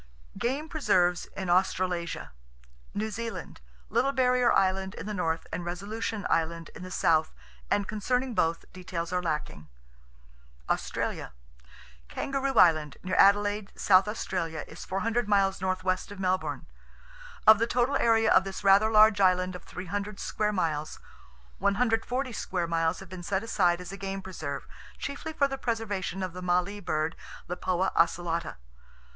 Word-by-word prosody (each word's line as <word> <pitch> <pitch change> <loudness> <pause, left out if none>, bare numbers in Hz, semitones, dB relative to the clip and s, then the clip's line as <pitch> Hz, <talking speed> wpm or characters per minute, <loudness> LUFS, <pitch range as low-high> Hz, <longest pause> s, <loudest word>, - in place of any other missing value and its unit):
Game 275 +6 -1
Preserves 185 - +1
In 190 - -3
Australasia 180 - 0 0.6
New 215 +1 -2
Zealand: 230 - -6 0.3
Little 245 +5 +1
Barrier 250 -2 +3
Island 190 0 +1
in - - -7
the 210 - -4
north, 165 -4 -1
and 175 - -3
Resolution 205 +5 -4
Island, 165 0 -1
in - - -10
the 185 - -7
south; 160 -3 +2 0.4
and 200 -1 +1
concerning 250 +4 -1
both, 165 -5 0
details 180 -2 -5
are 180 - +1
lacking. 150 - -4 1.0
Australia: - - -2 0.7
Kangaroo 275 - -2
Island, 155 -7 +4
near 185 - -4
Adelaide, 205 +1 +4
South 190 0 +5
Australia, 170 -7 -3
is - - -10
400 220 +4 -1
miles 195 -2 +2
northwest 185 0 -1
of 205 - -9
Melbourne. 185 0 -1 0.8
Of 220 0 +8
the 230 - +2
total 245 +3 +1
area 225 -1 +3
of - - +6
this 190 -1 -6
rather 200 +2 +6
large 215 -1 +6
island 185 -1 +3
of 180 - -8
300 200 +3 -5
square 210 0 -1
miles, 155 -6 -2 0.6
140 240 +4 0
square 180 -4 -2
miles 165 0 0
have 195 - -11
been 185 -1 -7
set 190 +3 -1
aside 180 -6 +2
as 180 0 -8
a 195 - -7
game 195 0 -5
preserve, 155 -7 -5 0.3
chiefly 280 +3 -5
for 285 -3 +2
the 270 -1 -5
preservation 205 -6 -2
of 185 -2 -4
the 180 - -7
mallee 180 +3 0
bird 155 -3 -1 0.3
(Lipoa 180 +1 -1
occelata). 170 0 +1
190 Hz, 145 wpm, -28 LUFS, 175-220 Hz, 1.0 s, Of